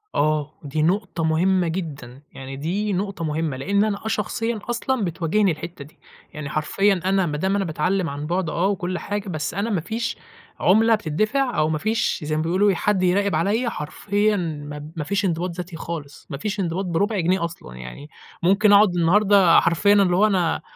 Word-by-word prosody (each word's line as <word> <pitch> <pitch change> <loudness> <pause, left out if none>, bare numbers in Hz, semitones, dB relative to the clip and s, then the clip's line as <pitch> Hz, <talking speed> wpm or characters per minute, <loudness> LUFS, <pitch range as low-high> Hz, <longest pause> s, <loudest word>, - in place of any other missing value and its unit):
آه، 150 0 0
دي 150 +1 -2
نُقطة 175 0 0
مُهمّة 175 +3 +2
جدًا، 150 -7 -6
يعني 135 0 -8
دي 195 +8 -2
نُقطة 190 -2 -3
مُهمّة؛ 155 -1 -1
لأن 200 +9 +1
أنا 215 -1 -2
آه - - -1
شخصيًا 225 +1 -2
أصلًا 240 0 -1
بتواجهني 180 +3 +1
الحتّة 155 -1 -7
دي، 150 - -21 0.3
يعني 150 -2 -6
حرفيًا 190 +6 +1
أنا 190 0 +2
ما 150 -3 -2
دام 190 +5 0
أنا 200 -1 0
باتعلم 180 +3 0
عن 145 +2 -5
بُعد 175 0 -1
آه 175 +4 0
وكُل 185 -2 -2
حاجة، 205 -1 -4
بس 155 -5 -3
أنا 200 +5 -2
ما 195 -7 0
فيش 225 +7 -3 0.4
عُملة 225 +4 +4
بتدِّفع 215 - -1
أو 155 0 +2
ما 155 - 0
فيش 220 +8 0
زي 155 +1 -2
ما 155 - 0
بيقولوا 185 +5 +2
حد 195 0 +1
يراقب 200 +2 +2
عليّا، 225 +5 +1
حرفيًا 205 +5 -1
ما 150 -3 -5
ما 160 - -3
فيش 200 +6 -1
انضباط 175 0 -1
ذاتي 180 -1 -6
خالص، 160 -3 -7
ما 140 - -5
فيش 210 +7 -3
انضباط 185 +1 -1
بربع 195 +5 0
جنيه 175 0 +1
أصلًا 160 - -9
يعني، 65 - -9 0.3
ممكن 200 +4 +4
أقعد 200 -3 +6
النهارده 190 +1 +5
حرفيًا 175 +4 +3
اللي 195 -3 +4
هو 200 +4 +4
أنا، 180 -7 +1
180 Hz, 190 wpm, -22 LUFS, 155-205 Hz, 0.4 s, أقعد